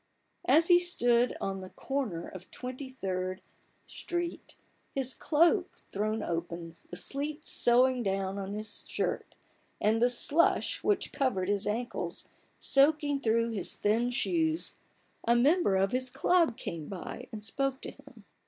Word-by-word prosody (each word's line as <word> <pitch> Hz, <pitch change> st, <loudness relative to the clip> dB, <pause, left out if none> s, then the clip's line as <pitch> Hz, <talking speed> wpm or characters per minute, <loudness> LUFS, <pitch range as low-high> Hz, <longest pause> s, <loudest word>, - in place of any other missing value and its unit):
As 325 Hz, +1 st, +5 dB
he 350 Hz, -1 st, +7 dB
stood 245 Hz, -9 st, +2 dB
on 195 Hz, 0 st, -3 dB
the 185 Hz, 0 st, -8 dB
corner 235 Hz, -13 st, -3 dB
of 185 Hz, -1 st, -11 dB
Twenty 255 Hz, +2 st, -6 dB
third 185 Hz, -6 st, -3 dB, 0.5 s
Street, 345 Hz, -1 st, -5 dB, 0.4 s
his 265 Hz, -1 st, 0 dB
cloak 340 Hz, +4 st, +2 dB
thrown 215 Hz, +2 st, -3 dB
open, 170 Hz, 0 st, -4 dB
the -, -, -7 dB
sleet 295 Hz, -, -4 dB
sowing 250 Hz, +1 st, +4 dB
down 195 Hz, -1 st, -1 dB
on 195 Hz, +1 st, -4 dB
his 215 Hz, -1 st, -6 dB
shirt, -, -, -2 dB, 0.4 s
and 220 Hz, +2 st, +2 dB
the 245 Hz, -, +5 dB
slush 290 Hz, +7 st, +2 dB
which 415 Hz, -3 st, 0 dB
covered 225 Hz, -10 st, 0 dB
his 205 Hz, -1 st, 0 dB
ankles 235 Hz, +4 st, -3 dB, 0.3 s
soaking 290 Hz, 0 st, +3 dB
through 230 Hz, -1 st, +1 dB
his 205 Hz, -5 st, -2 dB
thin 225 Hz, +4 st, +1 dB
shoes, 320 Hz, +5 st, 0 dB, 0.5 s
a 235 Hz, -, +4 dB
member 275 Hz, -, +4 dB
of 195 Hz, +1 st, +2 dB
his 255 Hz, 0 st, -1 dB
ciub 335 Hz, -1 st, +2 dB
came 165 Hz, -, -5 dB
by 190 Hz, -3 st, -7 dB
and 215 Hz, -1 st, -7 dB
spoke 270 Hz, +4 st, -1 dB
to -, -, -6 dB
him. 275 Hz, -7 st, -17 dB
240 Hz, 145 wpm, -30 LUFS, 200-280 Hz, 0.5 s, he